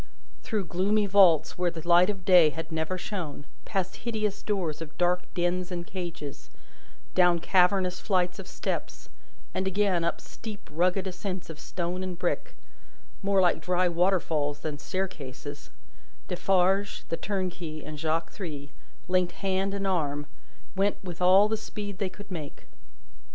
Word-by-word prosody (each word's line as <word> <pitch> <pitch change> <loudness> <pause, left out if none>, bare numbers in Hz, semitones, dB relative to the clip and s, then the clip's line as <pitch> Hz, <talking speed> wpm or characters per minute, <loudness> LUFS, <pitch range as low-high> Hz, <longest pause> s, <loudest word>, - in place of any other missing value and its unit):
Through 210 -4 -2
gloomy 200 +5 +2
vaults 185 -5 +5
where 180 -1 +3
the 165 -1 -8
light 175 +2 +6
of 195 -3 -3
day 180 -4 +8
had 160 +3 -6
never 160 +3 -1
shone, 170 -7 -5 0.2
past 190 -2 -2
hideous 215 -3 -2
doors 180 -7 -1
of 155 -1 -8
dark 180 0 +1
dens 180 +1 0
and 175 -1 -3
cages, 170 -7 -6 0.6
down 180 -2 +5
cavernous 180 +1 +3
flights 180 -3 +1
of 190 - -7
steps, - - -4 0.4
and 190 - -1
again 190 -3 +2
up 170 - 0
steep 215 -3 -9
rugged 180 +4 +2
ascents 185 -1 -4
of 155 - -10
stone 180 +1 -3
and 185 -2 -4
brick, - - -2 0.7
more 195 -1 +3
like 175 -2 +3
dry 180 0 +2
waterfalls 165 -5 +1
than 150 -2 -4
staircases, 145 -7 -5 0.6
Defarge, 190 +2 +2
the 165 - -1
turnkey, 180 -6 -3
and 150 -1 -7
Jacques 160 +1 0
Three, 145 -7 -6 0.4
linked 180 -1 +2
hand 195 0 0
and 200 0 -2
arm, 145 -6 0 0.5
went 200 +1 +2
with 180 -2 -7
all 190 +3 +7
the 220 +1 0
speed 205 -2 -6
they 195 -3 0
could 200 +1 -12
make. 155 -5 -6
180 Hz, 150 wpm, -28 LUFS, 165-195 Hz, 0.7 s, day